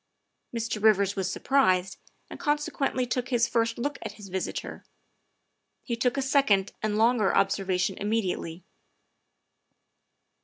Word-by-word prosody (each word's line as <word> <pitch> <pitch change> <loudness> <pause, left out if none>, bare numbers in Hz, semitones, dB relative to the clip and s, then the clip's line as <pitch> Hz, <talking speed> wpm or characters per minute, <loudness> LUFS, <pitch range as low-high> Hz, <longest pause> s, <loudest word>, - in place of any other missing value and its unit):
Mr. 230 -2 -3
Eivers 200 -2 +4
was 190 -2 -1
surprised, 190 -6 +1 0.3
and - - -10
consequently 295 -3 0
took 245 0 -2
his 235 -2 +2
first 230 -1 0
look 285 +4 -3
at - - -6
his 205 -2 -12
visitor; 185 0 -4 1.0
he 235 - -2
took 250 +3 0
a 275 - +1
second 260 -8 +2
and 215 -1 -1
longer 225 -2 +3
observation 190 -1 +1
immediately. 190 -5 -2
220 Hz, 120 wpm, -27 LUFS, 195-250 Hz, 1.0 s, Eivers